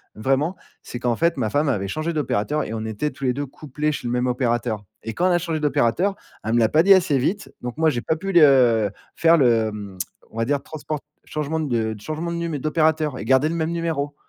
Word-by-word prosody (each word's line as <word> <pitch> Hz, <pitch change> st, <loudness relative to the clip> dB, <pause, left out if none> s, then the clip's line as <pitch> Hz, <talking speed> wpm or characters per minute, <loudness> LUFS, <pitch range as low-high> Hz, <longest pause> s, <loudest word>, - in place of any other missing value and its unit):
Vraiment, 135 Hz, -, 0 dB, 0.3 s
c'est 120 Hz, -, -7 dB
qu'en 120 Hz, -2 st, 0 dB
fait, 170 Hz, +4 st, +1 dB
ma 110 Hz, -4 st, 0 dB
femme 145 Hz, +5 st, +1 dB
avait 100 Hz, -7 st, -1 dB
changé 155 Hz, -, -2 dB
d'opérateur 150 Hz, -1 st, 0 dB
et -, -, -5 dB
on 110 Hz, -1 st, -3 dB
était 110 Hz, +7 st, -2 dB
tous 140 Hz, -, -12 dB
les 125 Hz, -, +2 dB
2 145 Hz, +2 st, -3 dB
couplés 150 Hz, +2 st, -3 dB
chez 140 Hz, -, -5 dB
le 120 Hz, -, -2 dB
même 125 Hz, +1 st, 0 dB
opérateur 120 Hz, -3 st, -1 dB, 0.2 s
et 115 Hz, -, -4 dB
quand 180 Hz, -, +2 dB
on -, -, +3 dB
a 175 Hz, -, +4 dB
changé 165 Hz, -2 st, -2 dB
d'opérateur, 150 Hz, -, +1 dB, 0.3 s
elle 110 Hz, +2 st, -1 dB
me 120 Hz, -, +4 dB
l'a 110 Hz, -, +4 dB
pas 160 Hz, +5 st, +4 dB
dit 195 Hz, +1 st, +8 dB
assez 165 Hz, -7 st, +3 dB
vite. 190 Hz, +11 st, -1 dB
Donc 125 Hz, +3 st, -5 dB
moi, 160 Hz, 0 st, +4 dB
j'ai 120 Hz, -5 st, -2 dB
pas 160 Hz, -, 0 dB
pu 195 Hz, +4 st, -4 dB
le, 175 Hz, -, +7 dB
heu, 120 Hz, -8 st, +5 dB, 0.2 s
faire 165 Hz, 0 st, +5 dB
le, 115 Hz, -5 st, +3 dB
mmh, 100 Hz, -3 st, -8 dB, 0.3 s
on 115 Hz, -, -12 dB
va 115 Hz, -, +1 dB
dire 140 Hz, +1 st, 0 dB
transport 155 Hz, 0 st, -5 dB, 0.3 s
changement 155 Hz, +1 st, -3 dB
de 115 Hz, -7 st, -1 dB
changement 155 Hz, +7 st, -4 dB
de 170 Hz, -, -3 dB
num 170 Hz, -3 st, -2 dB
d'opérateur 155 Hz, 0 st, +1 dB
et -, -, -5 dB
garder 135 Hz, +4 st, +3 dB
le 170 Hz, -, -2 dB
même 160 Hz, 0 st, -1 dB
numéro. 155 Hz, -4 st, -2 dB
145 Hz, 245 wpm, -22 LUFS, 120-160 Hz, 0.3 s, dit